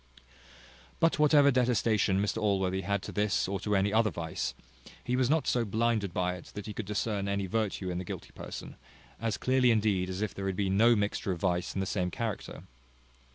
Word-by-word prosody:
But 165 -1 +2
whatever 145 -2 +6
detestation 115 -6 +2
Mr 105 +2 -1
Allworthy 95 -2 +1
had 100 0 -1
to - - -6
this 105 -3 +1
or 100 0 -2
to 105 +2 0
any 100 +1 +2
other 110 0 +4
vice, 80 -3 -4 0.5
he 125 - -1
was 130 -1 +2
not 155 -2 +2
so 120 - +1
blinded 110 -2 0
by 90 +1 0
it 90 - -13
but - - -15
that 105 -1 -6
he 105 - -6
could 105 -1 -5
discern 105 -1 -1
any 100 0 -1
virtue 100 -2 -2
in 90 - -3
the - - -4
guilty - - -7
person, - - -8 0.4
as 115 -1 -1
clearly 130 -1 +3
indeed 105 -5 +2
as 95 +3 -3
if 105 - -3
there 95 0 -4
had 95 - -1
been 95 0 0
no 115 +3 +6
mixture 100 -1 -1
of 85 - -8
vice 90 -1 0
in 95 - 0
the - - -1
same 90 -2 -1
character. 110 +2 -5
100 Hz, 210 wpm, -30 LUFS, 95-115 Hz, 0.5 s, whatever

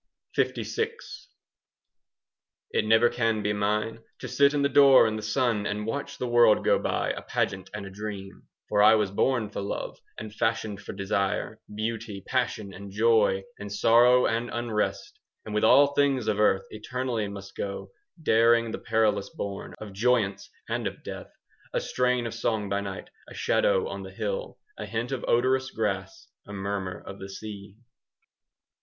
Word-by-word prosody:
LVI 450 +1 -1 1.8
It - - +1
never 110 +2 +5
can 115 -3 0
be 105 - +1
mine 105 +2 -1 0.2
To - - -7
sit 140 +1 +3
in 145 - +1
the - - +4
door 140 -2 +7
in 110 -1 0
the 110 - -4
sun 110 -1 0
And 105 +1 -3
watch 140 +6 -4
the 125 - -3
world 120 -3 +5
go - - +4
by, - - -1
A - - -5
pageant 95 0 -2
and 105 -1 -6
a 95 - -9
dream; 100 -1 -7 0.2
For 105 -1 +2
I 110 +1 +8
was 105 -3 +1
born 110 0 +1
for 100 - -4
love, 100 - -4
5 - - -33
And 105 -1 -7
fashioned 110 -2 -1
for - - -7
desire, 100 +2 -2
Beauty, 110 -2 -4
passion, 120 -6 -1
and 100 +1 -9
joy, 105 -2 +3 0.2
And 105 0 -7
sorrow 120 +4 +5
and 115 +1 0
unrest; 120 - -2 0.3
And 110 - -6
with 105 - 0
all 145 0 +6
things 140 -5 +2
of 105 -1 +1
earth 95 -2 +3
Eternally 120 0 -3
must 100 -1 -9
go, 100 -1 -5 0.3
10 165 - -18
Daring 115 -2 +4
the - - -4
perilous 110 -3 +1
bourn 100 -1 -6
Of 105 -2 -9
joyance 110 -2 +1 0.2
and - - -1
of - - -7
death, - - -8 0.4
A - - +1
strain 125 -1 0
of 115 - -4
song 110 -3 -1
by 100 +1 0
night, 95 -1 -7 0.2
A - - -11
shadow - - +2
on - - -6
the - - -8
hill, - - -4 0.2
A - - -5
hint 115 +3 -3
of 130 - -3
odorous 130 +2 +2
grass, 95 -4 -3 0.2
15 100 - -7
A - - -5
murmur 95 -2 -4
of 100 0 -9
the 95 - -8
sea. 100 0 -9
110 Hz, 175 wpm, -27 LUFS, 100-120 Hz, 1.8 s, I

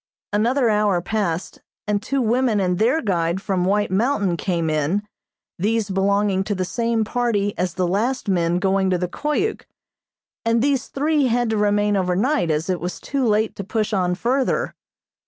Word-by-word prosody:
Another 240 +5 +2
hour 210 -3 +2
passed 180 -2 -3 0.2
and 210 -1 0
two 270 +3 -1
women 235 -1 +2
and 180 -2 0
their 250 +9 +2
guide 170 -3 0
from 190 -2 -1
White 205 +1 +1
Mountain 205 -3 +1
came 170 -2 -1
in, 155 +6 0 0.6
these 210 +1 0
belonging 195 0 +1
to 205 - -1
the 185 0 -1
same 230 +3 0
party 215 -3 0
as 180 -2 -2
the 185 -2 0
last 225 +8 -1
men 175 -2 +1
going 190 0 +1
to 185 - +2
the 180 0 -2
Koyuk, 300 - -2 0.8
and 230 0 +2
these 275 -3 +1
three 295 0 +1
had 240 -1 +1
to 220 - 0
remain 205 0 +2
over 180 -2 +1
night 255 - +1
as 155 +1 0
it 185 -2 -1
was 180 +3 -5
too 275 -3 -1
late 215 +1 +1
to 200 - -4
push 215 +2 -2
on 180 -2 +1
further. 250 +8 0
205 Hz, 175 wpm, -22 LUFS, 185-235 Hz, 0.8 s, Another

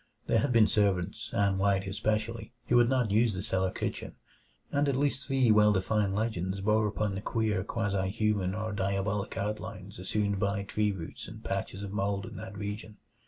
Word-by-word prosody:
There - - +3
had 140 - +1
been 115 -3 +6
servants 100 -3 0
Ann 100 -1 +1
White 100 0 +2
especially 110 +3 -2
who 120 - +2
would 120 0 +5
not 125 -5 +1
use 110 +1 +3
the 90 - -3
cellar 95 -3 0
kitchen, - - -4 0.6
and 140 0 +2
at 135 - +1
least 140 0 0
three 135 -4 +3
well 105 0 +6
defined 100 0 +1
legends 100 -3 -1
bore 105 +2 +2
upon 105 0 -1
the 95 - -4
queer 105 -4 0
quasi 100 -3 -1
human 100 -3 0
or 110 0 -3
diabolic 100 +1 -1
outlines 105 -2 -4
assumed 100 +1 0
by 100 0 0
tree 105 +1 0
roots 85 -5 -7
and - - -10
patches 100 - -3
of 100 - -5
mold 100 0 -1
in 115 -1 -9
that 110 -1 -7
region. 105 +1 -5
105 Hz, 185 wpm, -30 LUFS, 100-110 Hz, 0.6 s, been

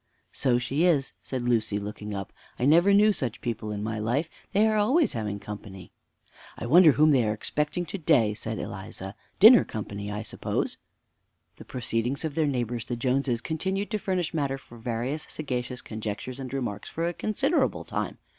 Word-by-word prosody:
"So 125 -3 +2
she 130 +6 0
is," 155 -7 +2
said 130 -2 -4
Lucy, 115 -4 +1
looking 105 0 -5
up: 95 -1 -6 0.2
"I 125 - 0
never 170 +7 +6
knew 210 +1 +6
such 125 - -3
people 115 -3 -3
in 105 0 -3
my 110 0 -2
life! 125 +9 -1 0.2
they 210 +3 +4
are 215 - +2
always 260 +10 +3
having 105 -3 -3
company." 100 -2 -9 0.7
"I - - -5
wonder 160 +4 +7
whom 155 +2 +5
they 130 -4 +4
are 105 -1 +1
expecting 150 +9 -2
to 200 - -5
day," 130 -10 +3
said 110 +1 -5
Eliza; 95 -1 -6 0.3
"dinner 230 +5 +9
company, 100 -1 -6
I 105 +1 -4
suppose." - - -2 0.8
The - - -11
proceedings 125 +3 -2
of 155 - -3
their 155 0 +1
neighbors, 120 -3 -2
the 120 - -3
Joneses, 125 0 0
continued 190 - -2
to 215 - 0
furnish 185 -4 -1
matter 140 -4 -1
for 120 -3 -15
various 120 +6 -3
sagacious 125 -4 -4
conjectures 110 +4 -5
and 130 -2 -6
remarks 125 -7 -4
for 165 +1 -2
a 175 - -1
considerable 270 - 0
time. - - -3
125 Hz, 180 wpm, -27 LUFS, 110-160 Hz, 0.8 s, dinner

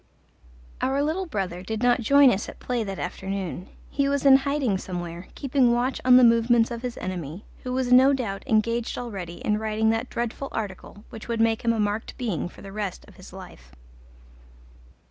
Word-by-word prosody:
Our 275 +2 +1
little 345 +5 -1
brother 185 - -3
did 220 +4 -4
not 245 0 +3
join 280 +3 +6
us 205 -1 -2
at - - -11
play 245 -2 -2
that 195 -2 -5
afternoon: 190 -2 -5 0.2
he 275 0 +1
was 280 0 -1
in 270 -1 +9
hiding 275 -7 -1
somewhere, 175 -1 -6
keeping 260 -3 +2
watch 245 +2 -1
on 250 0 +7
the 255 - +7
movements 230 0 +4
of 235 -1 -5
his 245 -1 -5
enemy, 180 0 -6 0.2
who 250 - -5
was 255 -1 +1
no 260 +2 +7
doubt 225 -8 -2
engaged 230 +1 0
already 195 -8 -6
in 210 0 +1
writing 220 0 +1
that 225 +3 -2
dreadful 240 +3 -3
article 205 0 -6
which 220 - -9
would 235 -1 -2
make 225 0 +2
him 235 - +3
a 230 - -1
marked 210 +1 -2
being 210 -8 -2
for - - -15
the 195 - -9
rest 200 -2 -5
of 205 - -17
his 185 - -13
life. 180 - -12
225 Hz, 190 wpm, -25 LUFS, 195-250 Hz, 0.2 s, in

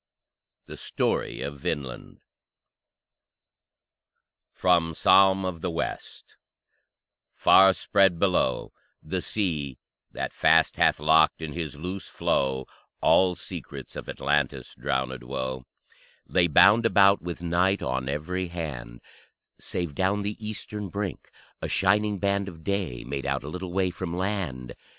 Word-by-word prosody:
THE - - -10
STORY - - -2
OF 70 0 -5
VINLAND 65 -3 -5 2.3
From 85 -3 +2
"Psalm 95 +2 +5
of 90 -3 -4
the 90 - -2
West" 85 0 -6 1.0
Far 95 0 +6
spread, 95 -4 +2
below, 90 -8 0 0.3
The - - -3
sea 75 - -2 0.3
that - - -5
fast - - +3
hath - - +3
locked 80 0 +4
in 80 -2 -6
his 80 -3 -5
loose 90 +6 -6
flow 65 -1 -1 0.3
All 90 -1 +4
secrets - - -9
of - - -7
Atlantis' 70 -1 -1
drownèd 65 -1 -2
woe 65 0 -4 0.6
Lay 90 -1 +2
bound 100 +8 +6
about 100 -2 +5
with 85 0 -6
night 90 +3 +1
on 65 +1 -2
every 90 +6 -3
hand, 75 -8 -6 0.6
Save 85 -4 -3
down 95 +6 0
the 105 +1 -3
eastern 105 -1 -6
brink 100 -1 -5 0.3
a - - -2
shining 105 +2 +1
band 100 0 0
Of 80 -3 -14
day 95 -11 -2
made 70 +2 -4
out - - -1
a - - -8
little 90 +2 -6
way 95 0 0
from 90 -1 -5
land. 85 -11 -3
85 Hz, 125 wpm, -26 LUFS, 70-95 Hz, 2.3 s, Far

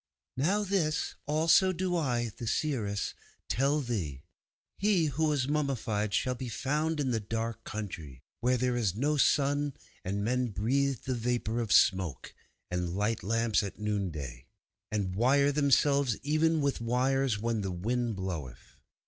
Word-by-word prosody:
'Now 185 +11 +1
this 180 -6 0
also 165 +5 +4
do 185 0 -1
I, 120 -8 0
the 115 - -6
seeress, 110 -7 -1 0.3
tell 140 +4 +1
thee. 90 - -3 0.6
He 195 -5 +3
who 160 +4 +1
was 145 -4 +1
mummified 130 -8 -1
shall 130 - +1
be 125 0 -6
found 150 +5 -1
in 135 -3 0
the 115 - +1
dark 115 +2 -4
country, 80 - -6 0.2
where 125 +2 +2
there 125 0 0
is 105 -7 0
no 145 +6 +1
sun, 145 0 +2 0.3
and 100 +2 -2
men 125 +3 +1
breathe 130 +6 0
the 130 - -1
vapour 120 -1 -1
of 115 -4 -2
smoke, 95 - +3 0.4
and 90 -1 -2
light 105 +3 0
lamps 115 +2 +1
at 100 -2 -6
noonday, 90 -13 -3 0.4
and 100 -4 -1
wire 140 +7 +3
themselves 140 -3 +3
even 155 +2 +2
with 140 -4 0
wires 125 0 +1
when 115 0 -1
the 95 -1 -2
wind 115 +5 -1
bloweth. 80 -10 -6
120 Hz, 150 wpm, -30 LUFS, 105-145 Hz, 0.6 s, also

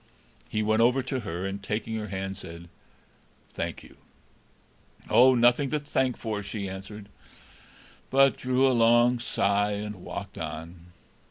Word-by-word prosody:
He 110 - -1
went 110 +1 +2
over 125 +3 +3
to 130 0 -3
her, 90 -4 -5
and, 100 +1 -4
taking 110 +3 -3
her 105 -1 -4
hand, 95 0 -4
said: 85 -2 -10 0.8
"Thank - - -5
you!" - - -17 1.1
"Oh, 130 +1 +7
nothing 120 +3 +4
to 150 - 0
thank 130 -3 -1
for!" 110 -3 -3
she 100 0 -5
answered, 95 +2 -8 1.0
but 135 0 +5
drew 130 +1 +1
a 130 - +3
long 120 +1 +4
sigh, 105 -3 +1
and 105 0 -5
walked 100 0 -7
on. 80 +2 -7
105 Hz, 145 wpm, -27 LUFS, 95-125 Hz, 1.1 s, Oh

